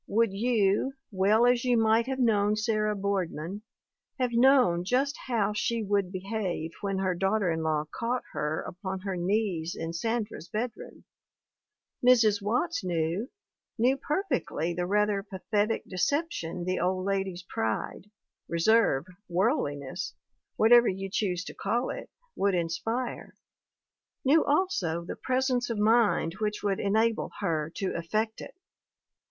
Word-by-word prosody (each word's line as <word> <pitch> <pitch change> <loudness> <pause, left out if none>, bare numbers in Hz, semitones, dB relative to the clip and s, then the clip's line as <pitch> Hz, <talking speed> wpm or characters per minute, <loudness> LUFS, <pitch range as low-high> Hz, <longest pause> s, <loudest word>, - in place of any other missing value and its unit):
Would 225 -1 +2
you, 215 +2 +1 0.2
well 205 +4 +3
as 245 -1 +3
you 250 -2 +3
might 225 +1 +3
have 265 0 -2
known 210 -4 +3
Sarah 215 -1 0
Boardman, 195 -2 -2 0.6
have 250 -2 0
known 240 -8 +5
just 265 - +1
how 215 -5 +1
she 225 +2 -1
would 200 -2 0
be 185 -1 -5
have 190 -5 -3
when 195 -2 -1
her 190 -1 +1
daughter 195 +1 +1
in 165 0 -1
law 155 -1 0
caught 240 +2 -2
her 150 +1 -1
upon 190 +1 -5
her 195 -1 -3
knees 180 -2 -1
in 165 0 -4
Sandra's 220 -1 -3
bedroom? 230 +3 -5 1.0
Mrs. 225 -5 +5
Watts 245 - 0
knew, 175 - -1 0.5
knew 250 +4 +3
perfectly 275 - -2
the 175 +1 -2
rather 210 0 +2
pathetic 205 +2 -1
deception 185 - -1
the 185 0 -1
old 185 +1 0
lady's 195 -3 -2
pride 110 - -3 0.4
reserve, 170 -4 +3 0.2
worldliness, 175 - -1 0.4
whatever 235 +2 +6
you 195 0 -3
choose 185 -4 -1
to - - -8
call 240 +2 -1
it - - -7 0.3
would 200 -1 +1
inspire; 225 +9 -3 0.9
knew 305 +4 +5
also 230 - 0
the - - -5
presence 255 -1 0
of 230 - -2
mind 210 -6 +3
which 210 -1 -2
w6uld 200 -2 0
enable 220 +3 +1
her 165 -6 -1
to 195 - -2
effect 215 +6 -2
it. - - -10
205 Hz, 135 wpm, -28 LUFS, 180-235 Hz, 1.0 s, whatever